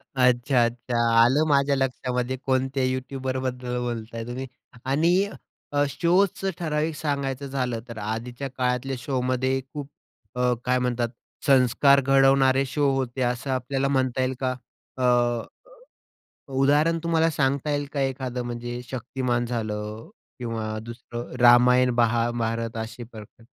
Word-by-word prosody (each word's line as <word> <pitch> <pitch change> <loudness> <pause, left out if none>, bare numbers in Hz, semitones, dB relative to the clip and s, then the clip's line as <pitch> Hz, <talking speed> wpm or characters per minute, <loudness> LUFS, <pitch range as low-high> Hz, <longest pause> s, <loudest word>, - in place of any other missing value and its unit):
अच्छा-अच्छा. 120 -1 +2 0.2
आलं 130 +6 +4
माझ्या 140 -1 +3
लक्षामध्ये 130 -1 -1
कोणत्या 130 0 0
यूट्यूबरबद्दल 130 -1 -2
बोलताय 115 -1 -4
तुम्ही. 125 +2 -4 0.4
आणि 155 +6 +2 0.6
अ, 145 0 +3
शोचं 185 +5 +1
ठराविक 155 -1 -1
सांगायचं 140 -2 -2
झालं 125 -4 -2
तर 115 - -9
आधीच्या 115 +5 -4
काळातल्या 125 +1 0
शोमध्ये 130 0 0
खूप 145 -2 -6 0.5
अ, 125 0 +2
काय 125 0 +2
म्हणतात 120 -1 0 0.4
संस्कार 140 +1 +5
घडवणारे 135 0 +4
शो 140 +2 +1
होते, 130 -1 -2
असं 125 +2 -1
आपल्याला 135 +1 -1
म्हणता 130 -2 +1
येईल 130 0 0
का? 130 0 +1 0.4
अ, 120 -2 +2 1.2
उदाहरण 150 +5 +3
तुम्हाला 165 -1 +2
सांगता 140 0 0
येईल 145 0 -1
का 140 - -2
एखादं 130 -2 -2
म्हणजे 120 0 -5
शक्तिमान 120 -1 -2
झालं 110 -2 -4 0.3
किंवा 110 -3 -3
दुसरं 120 +1 -8
रामायण, 125 +1 +6
महाभारत 115 -1 0
असे 120 +2 -9
प्रकार? 115 0 -13
130 Hz, 120 wpm, -25 LUFS, 120-135 Hz, 1.2 s, रामायण